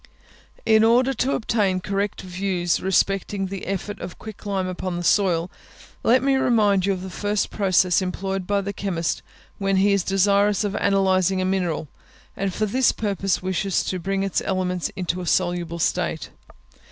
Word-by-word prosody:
In 220 -1 +5
order 250 +4 +4
to 260 +2 0
obtain 205 -5 0
correct 200 +2 -2
views 180 -2 -1
respecting 195 +1 0
the 190 0 -6
effect 195 +2 -4
of - - -7
quick 215 -1 -10
lime 195 -2 -1
upon 185 -1 -4
the 175 - -4
soil, 175 -2 +2 0.5
let 255 +2 +3
me 275 -1 +3
remind 210 -7 +3
you 200 - +3
of 185 -1 -6
the 190 - -6
first 205 +2 -1
process 185 -3 +2
employed 190 0 -3
by 200 -1 +1
the 200 +1 -4
chemist 175 -5 -2 0.4
when 195 -1 +1
he 200 +1 +4
is 200 - +2
desirous 200 +2 +2
of 205 -1 -2
analysing 190 -2 +2
a 185 - 0
mineral, 180 -5 -1 0.5
and 195 0 -2
for 215 - -1
this 250 +5 +2
purpose 195 -3 -1
wishes 190 +1 0
to 185 - -3
bring 195 +2 -1
its 195 - 0
elements 180 -2 -1
into 180 -1 -2
a 175 - -6
soluble 175 -2 0
state. 170 -1 -1
195 Hz, 170 wpm, -23 LUFS, 185-205 Hz, 0.5 s, In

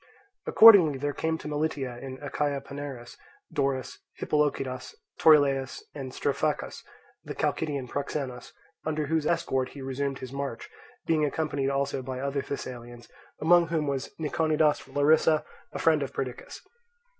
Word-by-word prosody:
Accordingly 190 -11 +8
there 145 +2 -2
came 160 +3 -1
to 160 - -9
Melitia 145 -5 -2
in 130 -1 -7
Achaia 145 0 -1
Panaerus, 140 -4 -8 0.4
Dorus, 135 -4 -1 0.2
Hippolochidas, 145 - -1 0.2
Torylaus, 140 -4 +4
and 135 -3 -6
Strophacus, 145 +3 -2 0.4
the - - -7
Chalcidian 140 -5 -1
proxenus, 135 -2 -4 0.3
under 155 -1 -1
whose 160 0 0
escort 135 -6 0
he 140 - -10
resumed 135 +1 -2
his 130 -1 -8
march, 140 -4 -5 0.3
being 160 -2 +2
accompanied 145 -2 -1
also 140 0 -1
by 130 0 -5
other 140 +1 -1
Thessalians, 120 -4 -7 0.3
among 170 +1 +5
whom 160 -2 -1
was 140 -2 -2
Niconidas 155 -1 +2
from 135 - -17
Larissa, 155 +1 +4 0.3
a - - -5
friend 155 -2 +3
of 140 - -3
Perdiccas. 125 -2 -6
140 Hz, 135 wpm, -27 LUFS, 135-155 Hz, 0.4 s, Accordingly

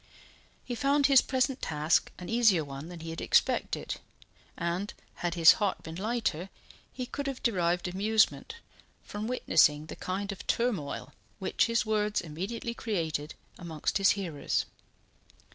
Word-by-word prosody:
He 250 - -4
found 280 +3 +2
his 270 -2 +7
present 260 0 0
task 155 +1 +1
an 180 - -8
easier 220 -8 +4
one 140 +3 -8
than 175 -2 -9
he 165 0 -6
had 165 - -6
expected; - - +1 0.6
and 175 +4 -2 0.3
had 175 -1 -2
his 165 -1 +9
heart 200 -2 0
been 160 - -7
lighter, 195 -2 -2 0.4
he 255 - -5
could 280 +3 -5
have 270 -2 -4
derived 180 -4 +1
amusement 215 - +1 0.5
from 210 +1 -5
witnessing 155 -11 +3
the - - -8
kind 200 +2 -3
of 195 - -9
turmoil 205 -13 -1 0.2
which - - +1
his 230 0 +1
words 210 -1 +1
immediately 190 +9 -4
created 160 -10 -3 0.2
amongst 165 +1 -2
his 195 - +5
hearers. 170 -7 -1
195 Hz, 145 wpm, -29 LUFS, 165-235 Hz, 0.6 s, his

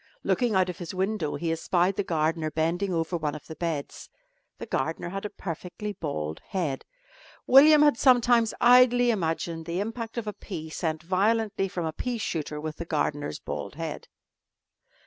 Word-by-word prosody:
Looking 240 -5 +1
out 185 -1 +3
of 180 -2 -6
his 175 0 -6
window 190 -4 -1
he 165 -1 -2
espied 175 +3 +1
the 200 - 0
gardener 160 -1 0
bending 170 +5 -1
over 165 0 -1
one 155 -2 -2
of 150 - -10
the 160 - -9
beds. 160 -4 -4 0.5
The - - -7
gardener 165 +1 -2
had 195 +3 -5
a - - -2
perfectly 185 +4 -6
bald 80 - -4
head. 160 -8 -2 0.6
William 300 +3 +8
had 295 -5 +4
sometimes 240 -3 +4
idly 245 0 +6
imagined 165 -4 -2
the 170 +2 -2
impact 225 +2 -4
of 235 - -2
a 210 - -4
pea 160 -7 -7
sent 160 0 -3
violently 200 +2 +1
from 180 -3 -4
a 160 - -3
pea 245 +5 -3
shooter 155 -7 -3
with 155 0 -5
the 170 - -5
gardener's 145 - -2
bald - - -6
head. - - -5
180 Hz, 170 wpm, -27 LUFS, 160-220 Hz, 0.6 s, William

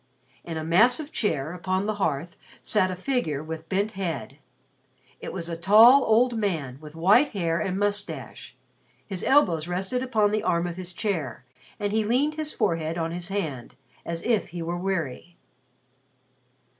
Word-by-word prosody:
In 165 -2 -5
a 160 - -3
massive 245 - +3
chair 160 - -1
upon 185 +2 -1
the 215 - 0
hearth 165 +2 -1 0.3
sat 195 -4 +2
a 185 - -3
figure 180 - -2
with 160 0 -7
bent 200 +3 0
head. 155 - -5 0.8
It - - -6
was 170 -3 -5
a 170 - -3
tall 220 +10 +7
old 235 +2 +3
man 160 - -2
with 155 0 -11
white 205 - +4
hair 170 -4 0
and 185 0 -2
moustache. 205 0 -3 0.5
His 190 -3 -5
elbows 175 - +3
rested 190 +8 -2
upon 220 -5 +1
the 215 0 0
arm 170 0 +1
of 175 -1 -4
his 185 -1 -4
chair 170 - -3 0.3
and 205 -1 -1
he 220 +1 +1
leaned 260 +8 +1
his 310 0 -3
forehead 165 0 -1
on 165 -1 -2
his 175 0 -3
hand 155 - -4 0.3
as 170 0 -4
if 230 -3 +1
he 170 0 -6
were 170 +1 -3
weary. 175 -3 -3
185 Hz, 165 wpm, -26 LUFS, 165-215 Hz, 0.8 s, tall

